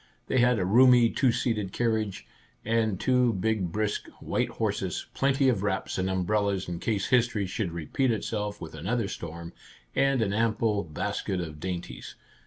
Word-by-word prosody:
They 130 - +1
had 125 0 +4
a 95 - 0
roomy 120 +3 +6
two 130 -3 +3
seated 110 -5 -1
carriage, 110 -4 -1 0.4
and 110 -3 +1
two 125 -2 +3
big 95 -2 -1
brisk, 105 +1 -2
white - - -1
horses, - - -2
plenty 135 0 +2
of 115 -7 +2
wraps 100 -2 -2
and 95 +1 0
umbrellas 100 +1 0
in 85 -1 -4
case 105 -2 -1
history 120 -5 +2
should 95 0 -3
repeat 85 - -1
itself 105 -2 -2
with 85 - -8
another 100 +8 -1
storm, 85 -1 -7 0.4
and 135 -3 +3
an 100 -2 -1
ample 110 -1 +1
basket 85 +3 -3
of 80 -3 -6
dainties. 90 0 -6
105 Hz, 160 wpm, -27 LUFS, 95-120 Hz, 0.4 s, roomy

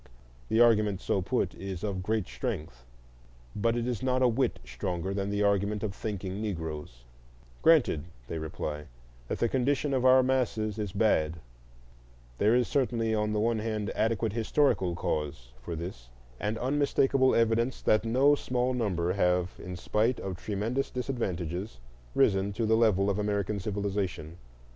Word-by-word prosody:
The 110 - +2
argument 105 -5 +4
so 100 - 0
put - - -1
is 95 -1 -6
of 100 -3 -2
great 110 +1 0
strength, 65 0 -5 0.7
but 115 +3 +1
it 120 - -1
is 120 -4 -2
not 130 0 +1
a - - +6
whit 125 +3 +1
stronger 90 +9 -3
than 100 0 -2
the 100 0 0
argument 100 +1 +1
of 105 -3 -2
thinking 100 -2 -4
Negroes: 80 - -5 0.6
granted, 135 - +4 0.2
they 80 - -4
reply, 75 -1 -5 0.4
that - - -2
the 120 - +2
condition 135 +3 0
of 130 -2 +1
our 130 0 +6
masses 115 -5 0
is 105 -3 -3
bad; 85 -7 +2 1.0
there 110 +3 +4
is 125 -1 +2
certainly 120 -5 0
on 105 0 0
the 105 - 0
one 115 +1 +1
hand 105 -2 -2
adequate 110 -1 0
historical 110 -6 +1
cause 70 -7 -3
for 85 +7 -5
this, 80 -8 -7 0.3
and 105 +2 -2
unmistakable 135 0 +2
evidence 115 +2 +2
that 110 - +3
no 130 +6 +4
small 125 -2 0
number 90 -8 0
have, 90 -2 +1
in 90 0 -6
spite 110 +7 0
of 95 -2 -4
tremendous 110 +8 -2
disadvantages, 95 - -3 0.4
risen 95 0 +3
to 115 +3 -1
the 110 +1 +3
level 105 -4 +3
of 100 0 0
American 105 0 -1
civilization. 95 -5 -3
105 Hz, 155 wpm, -29 LUFS, 90-120 Hz, 1.0 s, a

